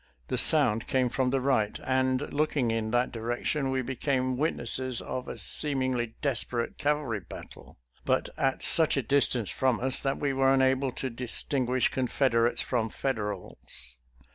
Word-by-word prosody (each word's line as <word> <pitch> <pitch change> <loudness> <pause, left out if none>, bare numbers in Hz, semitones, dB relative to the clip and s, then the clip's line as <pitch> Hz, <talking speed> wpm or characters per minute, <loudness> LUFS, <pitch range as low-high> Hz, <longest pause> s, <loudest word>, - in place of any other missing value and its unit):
The - - -1
sound 105 +1 +5
came 130 -2 +1
from 130 +1 0
the 135 +1 0
right, 125 -6 0
and, 130 +1 -1
looking 145 -5 0
in 110 -1 -2
that 120 +2 0
direction, 120 +5 -2
we 130 0 -1
became 130 0 -1
witnesses 130 -3 -1
of 130 0 -6
a - - -7
seemingly 130 -5 +1
desperate 120 -3 -2
cavalry 145 -7 -1
battle, 90 - -13 0.3
but - - 0
at 135 -1 -1
such 160 -3 +5
a 135 - 0
distance 125 -3 +1
from 130 -3 0
us 130 +1 +1
that 135 -1 -2
we 140 -2 -1
were 135 0 +2
unable 130 0 +2
to 130 - -4
dis 120 +1 -2
tinguish 130 -3 0
Confederates 120 -2 0
from 115 -3 -1
Federals. 105 - -6
130 Hz, 155 wpm, -28 LUFS, 120-135 Hz, 0.3 s, sound